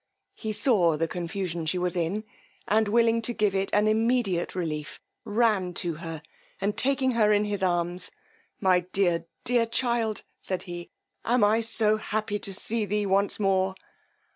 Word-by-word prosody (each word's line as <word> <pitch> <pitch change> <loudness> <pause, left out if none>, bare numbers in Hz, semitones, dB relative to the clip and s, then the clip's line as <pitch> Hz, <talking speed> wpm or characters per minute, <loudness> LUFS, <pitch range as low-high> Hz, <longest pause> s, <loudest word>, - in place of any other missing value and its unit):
He 220 - -4
saw 205 - +3
the 165 +1 0
confusion 175 -1 -4
she 180 - 0
was 180 0 -1
in, 175 +5 -1 0.4
and 215 +1 +3
willing 230 +1 +3
to 240 +2 0
give 210 -4 +1
it 195 0 0
an 210 +1 +3
immediate 220 -5 +1
relief, 155 -4 -4 0.3
ran 205 -5 +1
to 175 -2 0
her, 165 -3 -6 0.4
and 205 +1 -1
taking 265 -1 +1
her 220 -3 +3
in 210 0 +3
his 205 -1 -2
arms, 175 0 0 0.5
my 185 -2 +4
dear, 175 -2 0 0.2
dear 240 -1 +2
child, 230 -2 0 0.2
said 185 -1 -3
he, 175 -1 -7 0.3
am 240 -1 +2
I 215 +2 +4
so 220 -1 +2
happy 215 -1 -2
to 195 - -4
see 220 +4 -1
thee 210 +1 -1
once 200 +2 +2
more! 190 -1 +1
200 Hz, 165 wpm, -27 LUFS, 180-220 Hz, 0.5 s, my